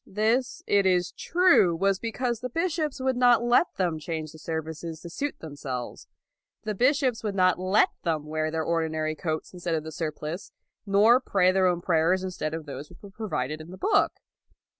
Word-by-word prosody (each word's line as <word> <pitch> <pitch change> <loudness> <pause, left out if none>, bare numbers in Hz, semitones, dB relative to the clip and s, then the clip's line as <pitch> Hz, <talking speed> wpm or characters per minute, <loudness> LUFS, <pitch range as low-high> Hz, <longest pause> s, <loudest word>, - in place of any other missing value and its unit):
This, 230 - 0
it 200 -1 +3
is 180 -1 +2
true, 345 - +3
was 195 +2 +1
because 235 0 -2
the 250 - -4
bishops 320 0 -1
would 260 0 0
not 245 -1 +4
let 240 +8 +4
them 175 -4 -1
change 155 -2 -5
the 160 - -13
services 160 0 -5
to 170 - -9
suit 290 +9 -3
them 160 - -9
2i6 145 - -14
LAUD 135 - -4
selves. 125 -1 -5 0.6
The 215 - -2
bishops 255 +1 +2
would 205 -2 -2
not 185 -2 +3
let 185 +3 +3
them 160 -3 -1
wear 155 0 -2
their 160 0 -2
ordinary 160 -1 -1
coats 155 +1 -4
instead 175 -2 -2
of 155 - -2
the 160 - -7
surplice, 155 +2 -5 0.4
nor 210 +5 +5
pray 195 -7 +2
their 190 0 +3
own 175 -1 0
prayers 180 +2 +2
in 185 - -3
stead 155 -3 -3
of 160 -1 -6
those 140 0 -8
which 180 - -17
were 200 - -11
provided 155 - -3
in 155 - -11
the 185 - -9
book. 405 - +2
180 Hz, 205 wpm, -26 LUFS, 160-225 Hz, 0.6 s, nor